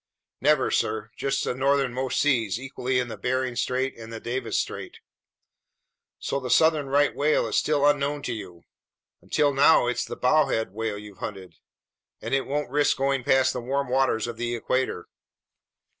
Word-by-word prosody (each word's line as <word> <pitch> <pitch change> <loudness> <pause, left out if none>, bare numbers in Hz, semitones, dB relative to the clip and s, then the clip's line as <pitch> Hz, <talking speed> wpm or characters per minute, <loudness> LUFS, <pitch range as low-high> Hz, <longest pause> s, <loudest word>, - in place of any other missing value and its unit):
"Never, - - +3
sir. 110 0 -1
Just 135 0 -1
the - - -1
northernmost 130 -1 0
seas, 115 -7 +1
equally 130 -1 -2
in 125 -1 0
the 115 - -8
Bering 130 0 -1
Strait 130 +2 -1
and 115 0 -9
the 115 - -6
Davis 125 +3 -3
Strait." - - -4 1.2
"So 140 - -2
the 130 -2 -6
southern 155 +2 +3
right 145 +1 +2
whale 150 +2 +2
is - - -3
still 145 -2 +2
unknown 145 0 +1
to 120 - -2
you. 90 -6 -9 0.6
Until 145 -2 +1
now 140 0 +5
it's 120 0 -1
the - - -6
bowhead 125 -6 +2
whale 110 -1 -3
you've 105 -1 -11
hunted, 95 -5 -7 0.7
and - - -5
it 135 0 +1
won't 145 -1 -2
risk 145 +1 +2
going 135 -1 0
past 130 +2 +3
the 125 - -4
warm 135 +2 -2
waters 130 -4 +1
of 120 -1 -6
the 120 0 -2
equator." 125 -5 -2
130 Hz, 170 wpm, -25 LUFS, 115-140 Hz, 1.2 s, now